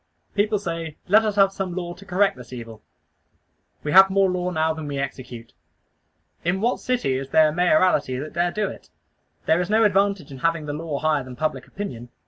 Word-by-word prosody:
People 210 +1 +1
say 165 -5 -5
"Let 215 +4 +5
us 210 -2 -1
have 195 -1 +5
some 190 -3 -4
law 175 -2 -4
to 200 +3 -15
correct 195 +1 +2
this 125 -1 -13
evil." 115 -3 -9 1.0
We 150 - -2
have 190 +2 +8
more 195 -1 +3
law 180 0 -1
now 160 -2 0
than 160 -1 -7
we 140 -1 -4
execute. 125 -4 -6 0.9
In 175 +3 0
what 235 +4 0
city 245 - -1
is 135 0 -7
there 155 +2 +5
a - - -4
mayoralty 160 -6 +2
that 150 +4 -6
dare 175 +1 +1
do 210 +3 -1
it? - - -10 0.6
There 160 +2 +3
is 180 - -3
no 220 +1 +4
advantage 200 -6 +1
in 135 - -9
having 165 0 0
the 145 - -4
law 155 -1 -4
higher 150 -2 +1
than 130 0 -10
public 145 -2 -3
opinion. 125 - -7
165 Hz, 205 wpm, -23 LUFS, 145-195 Hz, 1.0 s, have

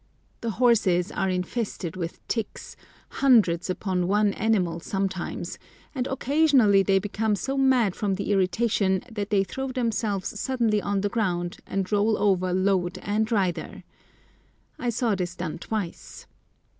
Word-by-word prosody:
The 230 - -2
horses 215 -7 +3
are 190 - -1
infested 185 -1 -3
with 170 -2 -6
ticks, 225 -3 -4 0.3
hundreds 210 -11 +3
upon 185 -1 -1
one 205 +1 +2
animal 185 -6 0
sometimes, 190 0 -3 0.3
and 260 -3 -2
occasionally 270 -7 +4
they 195 0 +3
become 205 +2 0
so 270 +8 -3
mad 260 -8 +3
from 200 -2 -1
the 200 +1 -3
irritation 190 0 +1
that 205 -2 -4
they 200 -2 +3
throw 265 +8 -5
themselves 220 -6 -2
suddenly 230 -5 +1
on 200 -1 -1
the 205 - 0
ground, 175 -6 -1
and 195 0 -2
roll 210 +1 +2
over 185 -3 +2
load 185 -1 +1
and 215 +2 0
rider. 190 -6 -1 1.0
I 245 - -1
saw 230 -1 0
this 180 -2 -3
done 165 -1 -5
twice. 205 -5 -5
205 Hz, 140 wpm, -25 LUFS, 185-225 Hz, 1.0 s, occasionally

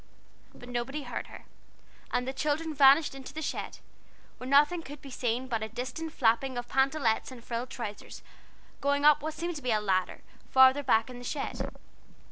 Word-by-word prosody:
But 245 - -12
nobody 245 +4 -3
heard 250 - -5
her, - - -12 0.7
and 250 +1 0
the 265 - -2
children 305 +3 -1
vanished 280 +2 +6
into 270 +1 -10
the 315 - -4
shed, - - -4 0.6
where 255 - -6
nothing 295 +5 +4
could 290 -1 -10
be 275 -1 -11
seen 245 +1 -2
but 230 -4 -2
a 220 - -4
distant 250 +8 -5
flapping 250 0 +1
of 240 0 -4
pantalettes 265 -3 +1
and 245 -3 -11
frilled 235 +1 -4
trousers, 210 -5 -7 0.6
going 285 +1 +1
up 300 0 +6
what 310 +1 -4
seemed 340 0 -3
to - - -8
be 250 - -3
a 215 - +3
ladder, 185 -3 -1 0.3
farther 260 +2 +6
back 235 -3 +2
in 245 - -9
the - - -10
shed. 275 +3 -4
265 Hz, 185 wpm, -29 LUFS, 240-290 Hz, 0.7 s, vanished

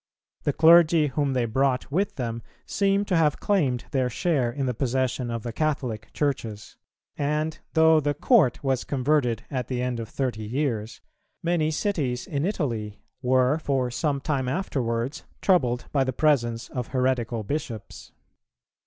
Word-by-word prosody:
The 145 - +2
clergy 160 -1 +6
whom 140 +1 0
they 125 -2 +1
brought 130 +3 0
with 190 +7 0
them 115 -2 -3 0.2
seem 200 0 +1
to 185 - 0
have 155 -3 +2
claimed 140 -12 +1
their 130 -2 +1
share 135 -3 0
in 135 +2 -3
the 125 - 0
possession 130 0 -1
of 115 -2 -4
the 120 - -5
Catholic 130 -7 -2
churches;[278:2] 115 - -5
and 155 +2 -1 0.2
though 160 0 +6
the 145 -1 -1
Court 180 - +3
was 135 -2 0
converted 130 -4 0
at 125 -4 -2
the 125 -2 -2
end 125 -2 -2
of 115 - -6
thirty 125 -5 -2
years, 115 -2 -2 0.4
many 165 -2 +1
cities 150 - -1
in 140 +2 -2
Italy 115 - -3 0.2
were 130 +3 +3
for 135 -5 0
some 140 +3 -1
time 135 -3 -1
afterwards 130 -5 -2 0.2
troubled 125 -11 +2
by 140 -2 +2
the 130 0 -2
presence 120 -6 +1
of 125 -3 -4
heretical 125 -3 0
bishops. 135 -3 -5
130 Hz, 155 wpm, -25 LUFS, 120-155 Hz, 0.4 s, clergy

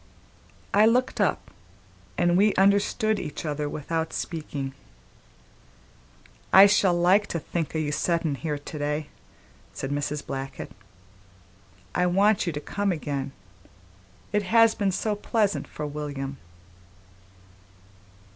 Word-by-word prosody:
I 210 +2 +6
looked 245 -1 +1
up, 200 - 0 0.7
and 175 0 +3
we 205 +3 +4
understood 205 +2 +2
each 150 - -6
other 150 -1 -2
without 160 +2 -3
speaking. 145 -5 -4 1.8
"I 195 +1 +10
shall 195 -3 +4
like 185 +4 +4
to 165 - -3
think 165 0 -4
o' - - +1
your 155 -2 -1
settin' 165 +1 0
here 150 +1 -3
to 145 +1 -8
day," 150 +1 -2 0.6
said 135 - -5
Mrs. 145 0 -2
Blackett. 135 0 -6 1.2
"I 180 0 +2
want 195 +2 +3
you 170 - -1
to 145 - -3
come 200 +6 -1
again. 145 -5 -3 1.0
It 210 - +3
has 225 +3 +4
been 200 -2 0
so 210 +3 -1
pleasant 205 -1 0
for 150 - -6
William." 145 -2 -5
170 Hz, 120 wpm, -26 LUFS, 150-200 Hz, 1.8 s, I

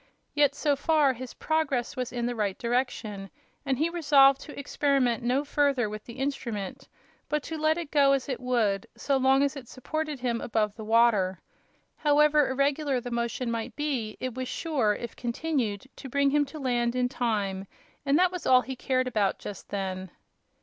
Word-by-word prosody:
Yet 290 -1 +3
so 290 0 +1
far 295 -1 +3
his 255 0 -8
progress 290 -7 -1
was 250 -2 -3
in 240 -1 -2
the 245 - -1
right 205 -4 -1
direction, 235 -5 -2 0.3
and 270 -3 0
he 310 +4 +2
resolved 285 -5 +5
to 295 - -9
experiment 275 -4 +1
no 250 +4 +1
further 280 -5 +1
with 215 0 -7
the 235 - -10
instrument, 265 -2 -4 0.4
but 300 -1 0
to 325 - -5
let 310 +1 +2
it 335 -4 -5
go 280 -2 +5
as 270 -2 -1
it 260 -3 -3
would, 230 -6 0
so 275 -1 +1
long 265 +1 +4
as 280 +1 0
it 265 -4 -9
supported 305 +3 -4
him 240 -2 -1
above 215 -3 0
the 220 - -8
water. 215 -5 +3 0.6
However 300 0 +4
irregular 275 0 +1
the 245 0 -7
motion 235 +1 -2
might 230 -1 -4
be, 265 -8 -2
it 255 -1 -3
was 255 +1 -4
sure, 260 -12 0
if 235 -2 -7
continued, 240 -4 -2
to 265 - -8
bring 280 +2 +2
him 295 0 +3
to 285 +3 -10
land 245 -3 0
in 250 0 +2
time, 205 -6 -2 0.4
and 280 +1 +3
that 365 +1 +4
was 360 -2 -5
all 255 -1 +6
he 265 +1 -6
cared 255 0 0
about 210 -5 +1
just 200 - -9
then. 190 -2 -4
255 Hz, 185 wpm, -27 LUFS, 235-285 Hz, 0.6 s, all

